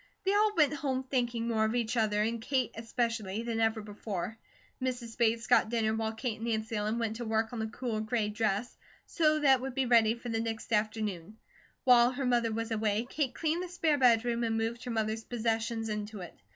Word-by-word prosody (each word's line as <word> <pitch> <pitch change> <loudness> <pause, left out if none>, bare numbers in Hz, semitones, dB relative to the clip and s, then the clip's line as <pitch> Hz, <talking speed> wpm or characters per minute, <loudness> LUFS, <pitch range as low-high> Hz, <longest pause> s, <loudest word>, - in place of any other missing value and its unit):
They 390 - +3
all 420 0 +3
went 300 -2 +4
home 270 -3 -2
thinking 240 -3 -1
more 220 -2 +1
of 220 +2 0
each 235 0 0
other, 210 -2 +2
and 230 +1 -2
Kate 255 -2 0
especially, 225 -2 -2
than 230 -1 -2
ever 225 -1 +1
before. 205 -1 -5 0.5
Mrs. 245 -3 -3
Bates 230 -1 +1
got - - +4
dinner 220 -2 +1
while 220 0 -1
Kate 225 0 -3
and 230 - -4
Nancy 220 0 -1
Ellen 210 +2 -1
went 225 -2 -2
to 240 - -4
work 220 +1 0
on 235 - -4
the 220 - -1
cool 230 -1 -3
gray 220 0 0
dress, 210 +1 -1 0.3
so 310 -2 +2
that 270 -3 +5
it - - -10
would 265 -1 -5
be 270 -1 +1
ready 230 -2 +4
for 240 0 -8
the 225 -1 -1
next 225 0 -3
afternoon. 210 -2 -1 0.5
While 245 -1 +6
her 260 +1 -3
mother 240 -2 +2
was 230 +1 -3
away 215 0 0
Kate 275 -5 -1
cleaned 325 +2 0
the 365 - -5
spare 325 -4 +1
bedroom 235 -1 +3
and 225 -1 0
moved 230 +2 -2
her - - -4
mother's 220 0 -1
possessions 225 -1 -1
into 210 -1 -4
it. 175 - -8
230 Hz, 215 wpm, -31 LUFS, 220-245 Hz, 0.5 s, While